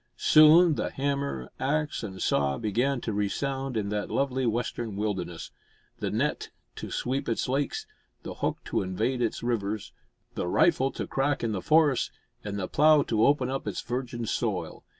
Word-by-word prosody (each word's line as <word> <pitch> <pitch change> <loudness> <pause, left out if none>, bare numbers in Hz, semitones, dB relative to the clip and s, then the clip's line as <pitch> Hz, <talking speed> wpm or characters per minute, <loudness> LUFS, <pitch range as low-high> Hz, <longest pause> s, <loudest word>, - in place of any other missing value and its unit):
Soon 155 +2 +7
the - - -2
hammer, 140 - -2
axe, 150 +3 -1
and 95 -4 -7
saw 70 -1 +1
began 120 +5 0
to 110 - -3
resound 135 +6 -2
in 100 -2 -1
that 105 0 -2
lovely 130 -2 0
western 115 -1 -2
wilderness; 95 -5 -3 0.5
the - - -2
net - - -1 0.3
to - - -6
sweep 130 +1 -2
its 115 - -1
lakes; 135 +2 -1 0.4
the - - -6
hook - - -2
to - - -1
invade 110 +7 -1
its 115 -1 -1
rivers; 110 -3 -2 0.4
the - - -3
rifle 135 - +3
to - - -4
crack 135 0 -1
in 115 - 0
the 100 -3 -2
forests, 150 - +3 0.3
and 100 -1 -4
the 95 -2 -2
plough 150 -1 +5
to 110 -3 +1
open 140 -3 +2
up 135 -4 -4
its 100 - -3
virgin 120 -1 -4
soil. - - -2
120 Hz, 170 wpm, -27 LUFS, 105-140 Hz, 0.5 s, Soon